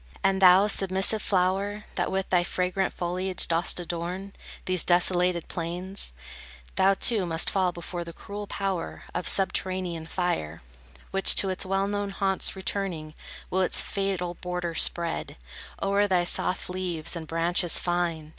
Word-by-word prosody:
And 195 Hz, 0 st, +2 dB
thou, 185 Hz, +1 st, +7 dB
submissive 195 Hz, +1 st, +2 dB
flower, 195 Hz, +2 st, 0 dB
That -, -, -1 dB
with 190 Hz, 0 st, -1 dB
thy 180 Hz, -1 st, +4 dB
fragrant 180 Hz, +1 st, -1 dB
foliage 180 Hz, +1 st, 0 dB
dost 170 Hz, +2 st, 0 dB
adorn 175 Hz, +3 st, -5 dB, 0.3 s
These 185 Hz, -2 st, +2 dB
desolated 180 Hz, -1 st, +2 dB
plains, 175 Hz, -, -3 dB, 0.6 s
Thou, 195 Hz, +1 st, +4 dB
too, 205 Hz, -3 st, +3 dB
must 165 Hz, 0 st, 0 dB
fall 185 Hz, -2 st, +1 dB
before 175 Hz, 0 st, -6 dB
the 170 Hz, -, -8 dB
cruel 205 Hz, +4 st, -8 dB
power 195 Hz, -4 st, -3 dB
Of 180 Hz, -, -2 dB
subterranean 185 Hz, -4 st, +1 dB
fire, 85 Hz, -, -3 dB, 0.5 s
Which, 195 Hz, 0 st, +4 dB
to 195 Hz, -, +2 dB
its 185 Hz, 0 st, -2 dB
well 195 Hz, +1 st, +1 dB
known 205 Hz, 0 st, -2 dB
haunts 195 Hz, -1 st, +1 dB
returning, 190 Hz, -5 st, -3 dB, 0.4 s
will 190 Hz, -, +1 dB
Its 185 Hz, -, +2 dB
fatal 190 Hz, -3 st, -2 dB
border 180 Hz, -1 st, -4 dB
spread 170 Hz, 0 st, +1 dB, 0.5 s
O'er 200 Hz, +1 st, +2 dB
thy 180 Hz, -3 st, +2 dB
soft 180 Hz, +1 st, +1 dB
leaves 180 Hz, -3 st, -3 dB
and 160 Hz, -2 st, -6 dB
branches 170 Hz, +2 st, +1 dB
fine. 175 Hz, -3 st, -1 dB
180 Hz, 145 wpm, -26 LUFS, 175-195 Hz, 0.6 s, thou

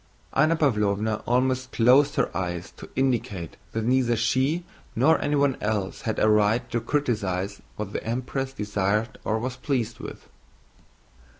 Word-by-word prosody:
Anna 155 Hz, +3 st, +4 dB
Pávlovna 110 Hz, -7 st, +1 dB
almost 130 Hz, +1 st, +1 dB
closed 135 Hz, +5 st, +5 dB
her -, -, 0 dB
eyes 85 Hz, -1 st, -3 dB
to -, -, -12 dB
indicate 115 Hz, -, -1 dB, 0.2 s
that 110 Hz, -, -1 dB
neither 125 Hz, -1 st, +3 dB
she 130 Hz, +9 st, +1 dB, 0.3 s
nor 145 Hz, +8 st, +4 dB
anyone 145 Hz, -2 st, +2 dB
else 105 Hz, -3 st, -2 dB
had 110 Hz, -, -2 dB
a -, -, +3 dB
right 105 Hz, +3 st, +3 dB
to 120 Hz, -2 st, 0 dB
criticize 105 Hz, -8 st, -1 dB
what 105 Hz, -1 st, -5 dB
the -, -, -3 dB
Empress 130 Hz, +3 st, -2 dB
desired 105 Hz, -1 st, -1 dB
or 110 Hz, -, 0 dB
was 125 Hz, +3 st, -4 dB
pleased 125 Hz, -5 st, -2 dB
with. -, -, -9 dB
115 Hz, 140 wpm, -25 LUFS, 105-130 Hz, 0.3 s, closed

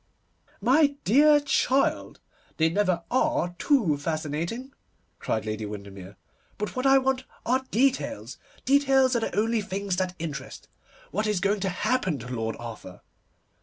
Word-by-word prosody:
'My 285 Hz, +3 st, +4 dB
dear 295 Hz, +7 st, +5 dB
child, 275 Hz, -1 st, 0 dB, 0.4 s
they 160 Hz, 0 st, +3 dB
never 180 Hz, -1 st, 0 dB
are 260 Hz, -, +1 dB
too 225 Hz, -, +2 dB
fascinating,' 165 Hz, -, -3 dB, 0.5 s
cried 110 Hz, -1 st, -2 dB
Lady 110 Hz, 0 st, -3 dB
Windermere. 100 Hz, -2 st, -9 dB, 0.4 s
'But 210 Hz, -, -4 dB
what 255 Hz, +1 st, 0 dB
I 270 Hz, 0 st, +7 dB
want 265 Hz, -1 st, 0 dB, 0.2 s
are 260 Hz, +2 st, +1 dB
details. 230 Hz, -, 0 dB, 0.3 s
Details 270 Hz, -1 st, +4 dB
are -, -, +3 dB
the 225 Hz, -, -3 dB
only 225 Hz, +2 st, +1 dB
things 200 Hz, -2 st, -3 dB
that 185 Hz, -1 st, -1 dB
interest. 145 Hz, -5 st, -7 dB, 0.4 s
What 210 Hz, +4 st, -1 dB
is 210 Hz, -3 st, +1 dB
going 200 Hz, +2 st, +1 dB
to 190 Hz, 0 st, -1 dB
happen 190 Hz, -, 0 dB
to 125 Hz, -1 st, -9 dB
Lord 115 Hz, -2 st, -2 dB
Arthur? 115 Hz, -6 st, -9 dB
205 Hz, 140 wpm, -26 LUFS, -, 0.5 s, I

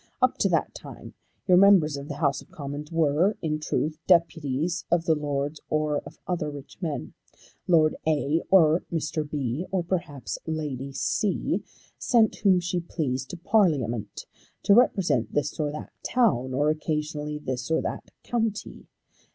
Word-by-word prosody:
Up -, -, +2 dB
to -, -, +3 dB
that -, -, 0 dB
time -, -, -10 dB, 0.3 s
your 180 Hz, -2 st, +6 dB
members 185 Hz, -6 st, +6 dB
of 140 Hz, 0 st, -7 dB
the 145 Hz, -, -5 dB
House 140 Hz, -3 st, 0 dB
of -, -, -18 dB
Commons 145 Hz, +1 st, -7 dB
were 165 Hz, +5 st, +2 dB
in 155 Hz, -1 st, -2 dB
truth 155 Hz, +1 st, -2 dB
deputies 170 Hz, -1 st, +2 dB
of 170 Hz, -1 st, +2 dB
the 160 Hz, -, +4 dB
Lords 145 Hz, 0 st, -2 dB
or 155 Hz, -1 st, +1 dB
of -, -, -13 dB
other 170 Hz, -4 st, -2 dB
rich 145 Hz, +4 st, -11 dB
men. 160 Hz, -5 st, -4 dB, 0.5 s
Lord 160 Hz, -3 st, +4 dB
A, 155 Hz, +1 st, +1 dB
or 165 Hz, -3 st, +5 dB
Mr. 155 Hz, -2 st, -2 dB
B, 145 Hz, +3 st, -2 dB
or 190 Hz, -2 st, 0 dB
perhaps 170 Hz, -6 st, -3 dB
Lady 145 Hz, -4 st, -3 dB
C, 190 Hz, +8 st, 0 dB, 0.4 s
sent 230 Hz, -3 st, +3 dB
whom 190 Hz, -3 st, +4 dB
she 175 Hz, 0 st, -2 dB
pleased 135 Hz, -6 st, -3 dB
to 180 Hz, -, -6 dB
Parliament 150 Hz, -, +1 dB, 0.4 s
to 200 Hz, -, +5 dB
represent 175 Hz, -, +3 dB
this 150 Hz, +2 st, -1 dB
or 150 Hz, -1 st, 0 dB
that 150 Hz, -, -8 dB
town, 175 Hz, -, +1 dB
or 145 Hz, +4 st, +2 dB
occasionally 150 Hz, -1 st, -3 dB
this 130 Hz, -3 st, -4 dB
or 160 Hz, -, +2 dB
that -, -, -5 dB
county. 225 Hz, -3 st, -3 dB
155 Hz, 155 wpm, -26 LUFS, 145-175 Hz, 0.5 s, your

